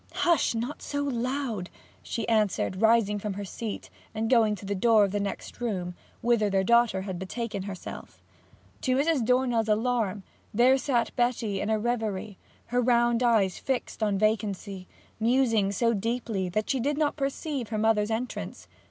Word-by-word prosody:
'Hush! 335 -8 +2
not 240 +6 -3
so 285 0 -2
loud!' 250 -6 -2 0.3
she 230 - -4
answered, 210 -3 +1
rising 220 -2 +4
from 205 0 -3
her 200 +1 -5
seat 215 +2 -6 0.2
and 225 +2 -1
going 225 -4 +4
to 200 - -11
the 200 - -1
door 215 +2 +4
of 195 - -4
the 205 - -1
next 200 +4 -5
room, 185 -7 -2 0.3
whither 230 -3 +3
her 195 -1 +2
daughter 235 -3 +3
had 190 -3 -5
betaken 200 +1 -4
herself. 195 -3 -8 0.6
To 255 -1 +1
Mrs. 285 -1 +2
Dornell's 245 -2 +2
alarm, 215 -3 0 0.3
there 255 +4 +5
sat 240 -3 0
Betty 235 -5 0
in 210 - -2
a 220 - +2
reverie, 215 -4 -2 0.3
her 245 - +3
round 240 -1 +3
eyes 220 -6 +2
fixed 265 -4 -3
on 205 -2 +1
vacancy, 200 -3 -1 0.3
musing 230 -4 +2
so 230 +4 +1
deeply 220 -3 -2
that 215 +4 -1
she 270 - 0
did 285 +4 0
not 300 -1 +1
perceive 275 -3 -3
her 220 - -2
mother's 215 -1 +2
entrance. 230 +3 -4
225 Hz, 165 wpm, -27 LUFS, 205-245 Hz, 0.6 s, there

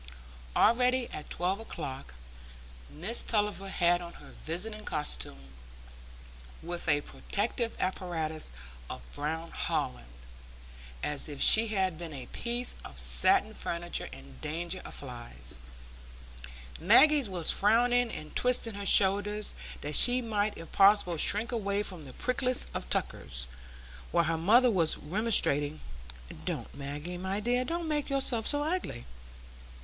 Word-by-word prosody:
Already, 250 +2 +2
at 150 - -8
twelve 185 +3 -1
o'clock, 140 - -8 0.8
Mrs 200 +10 +1
Tulliver 205 -3 -1
had 175 -1 +1
on 170 0 -9
her - - -15
visiting 210 +7 -5
costume, 70 - -4 1.1
with 170 0 -5
a 145 -1 +2
protective 225 +8 -3
apparatus 165 - -3 0.4
of 65 - -8
brown 160 +3 -4
holland, - - -4 0.9
as 150 0 -2
if 145 -2 -8
she 220 +9 +8
had 190 -6 -2
been 165 -3 -8
a 130 -2 -8
piece 240 - -3
of - - -11
satin 375 - +4
furniture 175 -3 -2
in 65 -1 -13
danger 170 +4 -3
of - - -9
flies; 120 - -7 1.2
Maggie 295 -5 +5
was 175 -4 +8
frowning 240 +3 +3
and 155 - -9
twisting 245 -2 +1
her 200 0 -2
shoulders, 205 +2 +5 0.3
that 150 0 -2
she 245 +1 +6
might 215 -3 -2
if 165 - -11
possible 195 -3 +4
shrink 215 +9 +3
away 205 -3 -2
from 180 -7 -6
the 130 - -12
prickliest 250 0 -1
of - - -6
tuckers, - - -3 0.7
while 170 - +2
her 165 0 -1
mother 235 +8 +4
was 170 -6 +1
remonstrating, 155 -5 +2 0.6
"Don't, - - -5
Maggie, 145 +5 -7
my 190 +2 -3
dear; 245 +3 0
don't 335 +5 -4
make 295 -2 -2
yourself 265 -5 +1
so 290 0 +1
ugly!" 315 - -4
190 Hz, 130 wpm, -29 LUFS, 155-230 Hz, 1.2 s, she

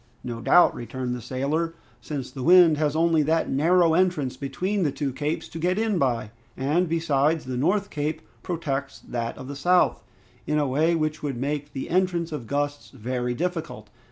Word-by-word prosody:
"No 120 -2 -5
doubt," 175 - +5
returned 125 +1 -4
the 125 - -5
sailor, 145 +7 -2 0.3
"since 140 -4 -5
the 130 - -7
wind 170 0 +6
has 150 -1 +1
only 165 -1 +3
that 160 +2 +1
narrow 165 +4 +4
entrance 160 -7 +1
between 185 +9 -2
the 150 -5 +1
two 140 -1 -3
capes 150 +4 -3
to 165 - -7
get 180 +3 +1
in 215 -4 +1
by, 120 -6 0 0.3
and, 155 +7 +1
besides, 160 -2 +1
the 130 0 -4
north 190 +10 +1
cape 150 +1 -3 0.2
protects 140 -5 -3
that 115 -1 -5
of 130 - -8
the 140 - -6
south 180 +6 +2 0.4
in 150 - +1
a 150 - +2
way 155 +6 +2
which 155 -1 -1
would 140 -4 -3
make 145 +3 -3
the 135 - -4
entrance 175 -2 +1
of 145 -7 -5
gusts 145 +1 -2
very 125 0 -3
difficult. 160 -10 -4
150 Hz, 185 wpm, -25 LUFS, 130-170 Hz, 0.4 s, wind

